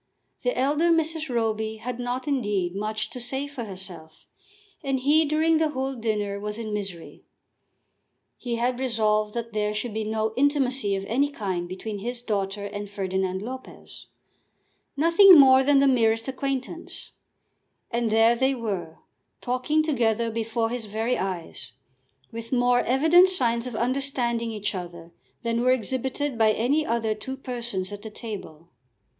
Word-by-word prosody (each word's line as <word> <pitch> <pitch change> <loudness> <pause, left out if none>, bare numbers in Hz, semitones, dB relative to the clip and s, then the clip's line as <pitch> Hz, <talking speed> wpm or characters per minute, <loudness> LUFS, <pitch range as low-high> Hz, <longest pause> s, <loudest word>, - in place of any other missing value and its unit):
The - - -1
elder 295 +6 +2
Mrs. 320 -2 +1
Roby 220 -2 -1
had 245 +2 -5
not, 245 +3 -3
indeed, 205 -10 0
much 215 +1 -3
to 250 - -7
say 265 +3 -2
for 285 -5 -6
herself, 185 -5 -9 0.6
and 270 -2 0
he 305 +4 +4
during 315 +2 +2
the 320 -1 +2
whole 270 -2 -2
dinner 210 -4 -2
was 210 +1 -4
in 220 -2 -5
misery. 195 -5 -6 1.1
He 240 -2 -4
had 245 +2 0
resolved 215 -4 +1
that 230 -1 -4
there 210 0 -1
should 215 +1 -3
be 220 0 -2
no 220 0 -1
intimacy 265 -6 +1
of 195 0 -4
any 270 +7 +1
kind 185 -9 -3
between 205 +3 -5
his 240 +3 -5
daughter 200 -2 -2
and 205 0 -6
Ferdinand 190 -1 -2
Lopez, 260 +3 -9 0.9
nothing 335 +3 +8
more 265 -1 +8
than 280 +1 +4
the 275 0 +5
merest 225 -3 +2
acquaintance; 270 +4 -4 0.8
and 235 -1 0
there 225 +2 +5
they 265 +3 +1
were, 195 -9 -4 0.4
talking 255 +5 0
together 235 -6 +1
before 225 0 -1
his 245 -2 -3
very 220 +4 -1
eyes, 170 -9 -5 0.6
with 230 0 -7
more 245 -1 +3
evident 320 +10 +5
signs 240 -8 0
of 245 - -6
understanding 240 -1 0
each 210 -1 -3
other 170 -2 -8 0.3
than 230 0 0
were 255 +1 +4
exhibited 260 +2 -1
by 215 -1 +5
any 270 +8 +1
other 230 -4 0
two 260 +5 -7
persons 235 -8 -4
at 205 0 -7
the 220 - -7
table. 195 -8 -8
235 Hz, 150 wpm, -25 LUFS, 210-265 Hz, 1.1 s, nothing